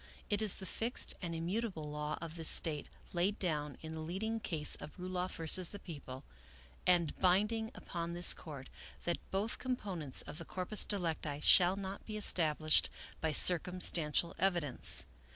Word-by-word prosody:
" - - -25
It 205 +1 +2
is 215 -3 +3
the 190 - -8
fixed 230 +6 -2
and 170 -3 -4
immutable 180 +1 -3
law 150 +1 -4
of 165 -1 -8
this 165 -2 +2
State, 150 -3 +3 0.2
laid 185 +4 0
down 150 -6 -3
in 160 0 -7
the 160 - -6
leading 195 +8 -3
case 160 -8 +3
of 150 - -11
Ruloff 180 0 -4
z>. 185 - +3
The 205 - -7
People, 140 -8 -9 0.6
and 175 -4 +3
bind 190 +4 +3
ing 225 -1 -3
upon 170 -1 -6
this 175 0 +6
Court, 140 -5 -10 0.3
that 175 - -2
both 200 +4 -2
components 190 - +1
of 150 - -9
the 165 - -8
corpus 185 +5 +2
delicti 160 -7 -2
shall 180 0 +6
not 195 0 -7
be 215 -1 -5
established 155 -6 +3 0.3
by 160 - 0
circumstantial 170 -1 +3
evidence. 175 -9 0
175 Hz, 165 wpm, -34 LUFS, 155-195 Hz, 0.6 s, this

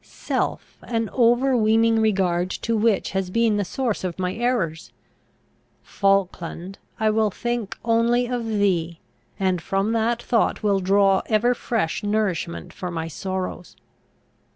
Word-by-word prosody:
self, - - -4
an 225 -3 -2
overweening 230 -2 +3
regard 185 -4 +1
to 230 +4 -2
which 215 -2 +1
has 190 -1 -2
been 225 +1 +2
the 205 - +1
source 235 +1 -2
of 180 -3 -3
my 185 0 -1
errors! 220 -9 -1 0.9
Falkland, 195 -2 -1 0.2
I 220 -1 +3
will 215 0 +2
think 235 0 -3
only 235 +1 +2
of 245 -1 -2
thee, 185 -6 0 0.4
and 185 -3 +1
from 195 +5 -1
that 230 +1 +1
thought 235 -2 0
will 200 -2 +2
draw 195 0 +3
ever 230 +3 +3
fresh 225 -8 -2
nourishment 190 - -2
for 180 - -5
my 165 -2 -4
sorrows! 185 +1 -5
205 Hz, 130 wpm, -23 LUFS, 185-230 Hz, 0.9 s, overweening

